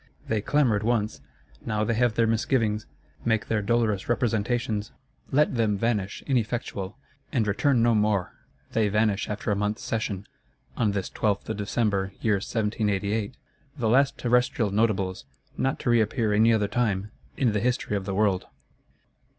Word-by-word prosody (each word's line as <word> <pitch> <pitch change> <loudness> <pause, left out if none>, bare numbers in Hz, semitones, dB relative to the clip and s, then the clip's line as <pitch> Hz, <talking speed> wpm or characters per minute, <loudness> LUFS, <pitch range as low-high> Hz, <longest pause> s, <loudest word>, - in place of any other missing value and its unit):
They 110 -2 0
clamoured 120 -4 +2
once; 110 - 0 0.4
now 105 -1 -1
they 115 - +1
have 120 0 +2
their 115 - +3
misgivings; 115 -2 +1 0.4
make 110 -2 +1
their 110 -2 +1
dolorous 110 -2 0
representations. 115 -2 0 0.4
Let 150 +3 +3
them 110 -4 +1
vanish, 105 -3 -1
ineffectual; 115 -5 -2 0.3
and 115 -5 +1
return 115 +4 +2
no 120 0 +4
more! 105 -4 +1 0.4
They 110 -2 +2
vanish 105 -1 +1
after 105 0 -2
a - - +2
month's 105 +1 -2
session, 105 -3 -2 0.5
on 105 -4 +1
this 95 -2 -2
12th 105 -2 -1
of - - -2
December, 100 -2 0
year 110 -3 +2
1788: 105 +1 -1 0.4
the 115 -5 0
last 135 +3 +3
terrestrial 120 -3 +1
Notables, 100 -3 0 0.3
not 135 - 0
to 120 - +1
reappear 110 -1 +2
any 110 +2 +5
other 105 -2 +2
time, 105 -2 -1 0.3
in 125 -4 +2
the 105 - 0
History 120 -2 0
of 100 -2 -2
the 95 -1 -3
World. 100 -3 +1
110 Hz, 150 wpm, -26 LUFS, 105-120 Hz, 0.5 s, any